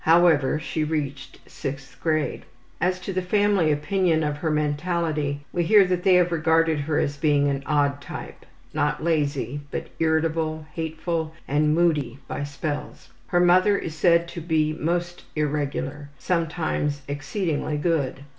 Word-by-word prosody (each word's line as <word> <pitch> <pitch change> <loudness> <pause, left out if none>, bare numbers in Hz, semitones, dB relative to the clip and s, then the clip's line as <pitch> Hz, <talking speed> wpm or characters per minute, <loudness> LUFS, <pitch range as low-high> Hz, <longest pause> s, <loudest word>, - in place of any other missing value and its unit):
However, 160 -4 +4
she 155 0 -2
reached 145 -3 -4
6th 135 -2 -7
grade. 155 -2 -1 0.4
As 180 +1 +1
to 195 - -4
the 185 - 0
family 200 -3 +2
opinion 160 +2 +1
of 150 -1 -1
her 160 +2 -2
mentality 150 -1 -1
we 175 - +1
hear 200 +3 +6
that 180 -1 0
they 185 0 +5
have 180 -1 +4
regarded 160 -1 +2
her 150 +1 -1
as 145 0 0
being 145 -1 +3
an 140 -1 -1
odd 145 -1 +1
type, - - -9 0.3
not 150 +1 0
lazy, 145 -4 0
but - - -5
irritable, 160 -1 0
hateful, 160 -1 -3
and 150 +2 +2
moody 150 -7 +1
by - - -4
spells. 145 +1 -5 0.2
Her 175 - +2
memory 185 +3 +4
is 160 - -4
said 170 +2 +3
to 170 -1 -6
be 155 -2 +1
most 175 +2 -2
irregular, 145 -1 -2
sometimes 160 -3 -1
exceedingly 150 +1 -2
good. 145 -4 0
155 Hz, 145 wpm, -24 LUFS, 145-170 Hz, 0.4 s, hear